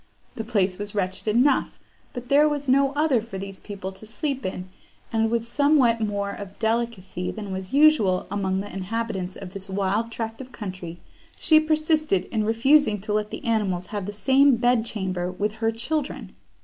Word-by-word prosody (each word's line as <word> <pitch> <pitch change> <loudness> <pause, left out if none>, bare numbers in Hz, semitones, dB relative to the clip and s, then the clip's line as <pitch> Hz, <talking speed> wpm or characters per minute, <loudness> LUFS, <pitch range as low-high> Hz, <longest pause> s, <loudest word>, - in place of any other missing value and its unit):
The 225 - -5
place 200 -5 0
was 205 0 -4
wretched 190 +1 -2
enough, 250 +5 +2 0.3
but 245 -1 -7
there 295 +2 +5
was 290 -1 -3
no 270 +1 +4
other 290 -5 +2
for 225 -3 -8
these 195 0 -7
people 195 -2 -6
to 190 +3 -12
sleep 270 +3 -3
in; 185 0 -5 0.5
and, 225 0 +2
with 230 0 0
somewhat 260 -3 +3
more 200 -2 -1
of 200 -1 -9
delicacy 220 -5 -2
than 210 -2 -6
was 190 0 -5
usual 275 -11 +4
among 190 -1 0
the 205 -1 -8
inhabitants 195 -1 -3
of 190 -2 -9
this 195 0 -7
wild 200 +4 0
tract 225 +1 -5
of 255 -1 -10
country, 185 -6 -7 0.4
she 315 -1 +6
persisted 310 - +1
in 220 -2 0
refusing 230 0 +3
to 210 +1 -3
let 210 0 0
the 310 - -7
animals 200 -6 0
have 200 -2 -3
the - - -3
same 265 +5 +4
bed 240 -1 +2
chamber 185 -4 -2
with 205 +3 -1
her 225 0 +2
children. 265 +6 -3
220 Hz, 180 wpm, -24 LUFS, 195-255 Hz, 0.5 s, she